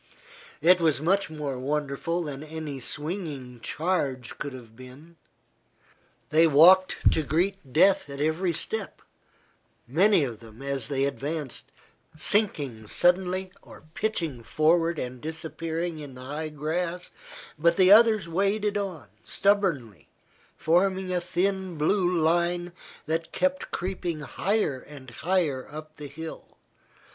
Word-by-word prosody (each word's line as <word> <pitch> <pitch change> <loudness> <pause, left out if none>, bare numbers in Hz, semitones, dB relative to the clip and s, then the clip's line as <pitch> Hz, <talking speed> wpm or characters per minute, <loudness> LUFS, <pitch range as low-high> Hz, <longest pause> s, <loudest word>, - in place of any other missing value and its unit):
It 180 0 +6
was 160 -4 +2
much 190 +5 +1
more 145 -4 -4
wonderful 150 +5 -2
than 145 -3 -5
any 155 -3 -6
swinging 145 -4 -5
charge 140 -4 -2
could 145 - -4
have 120 -4 -12
been. 130 +7 -13 1.2
They 160 +2 +6
walked 180 +5 +6
to - - +1
greet 165 +1 -1
death 185 +2 +4
at 140 0 -7
every 160 +4 +1
step, 200 +5 -3 0.8
many 175 - +4
of 120 -5 -4
them, 115 +2 -13
as 140 -4 -3
they 135 -1 0
advanced, 140 0 -4 0.5
sinking 145 - 0
suddenly 185 - +1
or - - -14
pitching 165 - -2
forward 165 +7 +2
and 125 -2 -5
disappearing 160 +1 -4
in 145 -3 -9
the 125 - -10
high 150 +3 -4
grass, 165 +4 -3 0.5
but 170 +2 +3
the 185 0 +6
others 215 -3 +6
waded 200 +4 0
on, 180 - -5 0.2
stubbornly, 165 - 0 0.5
forming 185 +3 +1
a 180 - 0
thin 185 0 -1
blue 180 +4 +2
line 175 +1 +1 0.3
that 165 +1 -2
kept 275 0 -1
creeping 175 -3 -3
higher 150 - -1
and 135 -4 -12
higher 160 -2 -1
up 155 +1 -10
the 150 -1 -7
hill. 160 +4 -9
160 Hz, 125 wpm, -26 LUFS, 140-180 Hz, 1.2 s, It